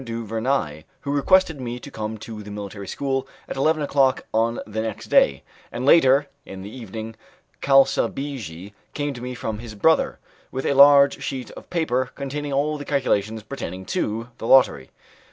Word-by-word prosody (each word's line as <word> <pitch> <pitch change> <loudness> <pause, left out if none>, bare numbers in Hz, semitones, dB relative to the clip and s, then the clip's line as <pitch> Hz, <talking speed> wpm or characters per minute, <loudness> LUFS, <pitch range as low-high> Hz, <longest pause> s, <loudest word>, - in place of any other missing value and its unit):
du 115 -1 -5
Vernai, 110 - -1 0.2
who 140 - -3
requested 160 +1 +3
me 120 0 -4
to - - -11
come 110 0 -5
to 110 0 -8
the 105 - -10
military 100 -1 -7
school 135 -1 -2 0.2
at - - -5
eleven 155 +3 +1
o'clock 135 -2 +2
on 115 +1 +1
the 110 +1 -3
next 110 -2 -5
day, 70 0 +4 0.3
and 120 +2 -4
later 140 -2 +6 0.2
in 95 -4 -9
the 105 +5 -9
evening 110 -2 -7 0.5
Calsabigi 135 - +1 0.2
came 145 -1 -2
to 125 - -9
me 125 0 -5
from 110 -3 -4
his 115 -2 -9
brother, 160 +11 +2 0.3
with 130 - -4
a - - +2
large 140 0 +7
sheet 130 -2 -5
of - - -12
paper 130 -7 0
containing 145 +1 -4
all 145 +2 0
the - - -5
calculations 110 -7 0
pertaining 95 -6 -6
to 115 +5 -2
the 115 - -4
lottery. 125 - +4
125 Hz, 170 wpm, -23 LUFS, 110-140 Hz, 0.5 s, large